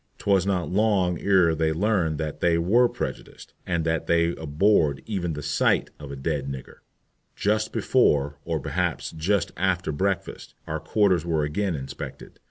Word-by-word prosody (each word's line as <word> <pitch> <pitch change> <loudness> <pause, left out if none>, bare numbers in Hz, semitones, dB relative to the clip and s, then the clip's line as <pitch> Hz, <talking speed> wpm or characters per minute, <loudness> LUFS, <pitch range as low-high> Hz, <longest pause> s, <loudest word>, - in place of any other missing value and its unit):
'Twas 100 -2 +2
not 90 -3 0
long 95 -3 +1
ere 95 -5 +4
they 80 0 +1
learned 85 -3 +1
that 75 -1 -4
they 85 -1 +2
were 115 +9 +3
prejudiced, - - -7
and 85 -2 0
that 80 -1 -1
they 85 0 +3
abhorred 80 -2 +1
even 90 -6 -2
the 75 0 -6
sight 75 +2 +1
of 75 -2 -8
a - - -5
"d 70 +1 -2
d 70 - -8
nigger." 70 -2 -7 0.6
Just 110 +1 0
before, 70 0 +2
or 80 -2 -2
perhaps - - -2
just 95 +5 0
after 90 -1 0
breakfast, 95 +5 -3
our 80 0 -3
quarters 90 +2 +2
were 80 -3 0
again 85 +5 -1
inspected. 65 -2 -8
85 Hz, 165 wpm, -25 LUFS, 75-95 Hz, 0.6 s, ere